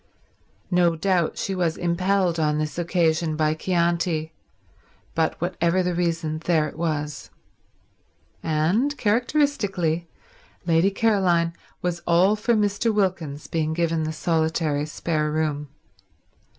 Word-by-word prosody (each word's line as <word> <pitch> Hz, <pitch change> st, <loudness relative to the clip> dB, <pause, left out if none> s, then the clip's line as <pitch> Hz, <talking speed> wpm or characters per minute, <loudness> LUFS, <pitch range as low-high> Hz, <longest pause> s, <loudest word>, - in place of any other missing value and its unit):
No 175 Hz, -2 st, +3 dB
doubt 175 Hz, -1 st, 0 dB
she 195 Hz, -, -2 dB
was 175 Hz, -3 st, 0 dB
impelled 180 Hz, 0 st, +1 dB
on 150 Hz, -1 st, +1 dB
this 155 Hz, +2 st, -3 dB
occasion 165 Hz, -2 st, +1 dB
by 155 Hz, 0 st, +2 dB
Chianti, 170 Hz, -1 st, 0 dB, 0.8 s
but 165 Hz, -1 st, 0 dB
whatever 175 Hz, +1 st, +1 dB
the 180 Hz, 0 st, 0 dB
reason 165 Hz, -2 st, -1 dB
there 160 Hz, -2 st, +1 dB
it -, -, -9 dB
was. 150 Hz, -3 st, -3 dB, 1.1 s
And, 180 Hz, -, +1 dB
characteristically, 205 Hz, -, 0 dB, 0.6 s
Lady 165 Hz, +2 st, +3 dB
Caroline 190 Hz, -6 st, +2 dB, 0.3 s
was 175 Hz, -1 st, -2 dB
all 180 Hz, +5 st, +4 dB
for 230 Hz, +2 st, +1 dB
Mr. 210 Hz, +2 st, +1 dB
Wilkins 175 Hz, -8 st, -1 dB
being 160 Hz, -1 st, -1 dB
given 165 Hz, -1 st, 0 dB
the 155 Hz, 0 st, -2 dB
solitary 160 Hz, -2 st, 0 dB
spare 155 Hz, -1 st, -1 dB
room. 150 Hz, -1 st, -1 dB
170 Hz, 115 wpm, -24 LUFS, 155-185 Hz, 1.1 s, all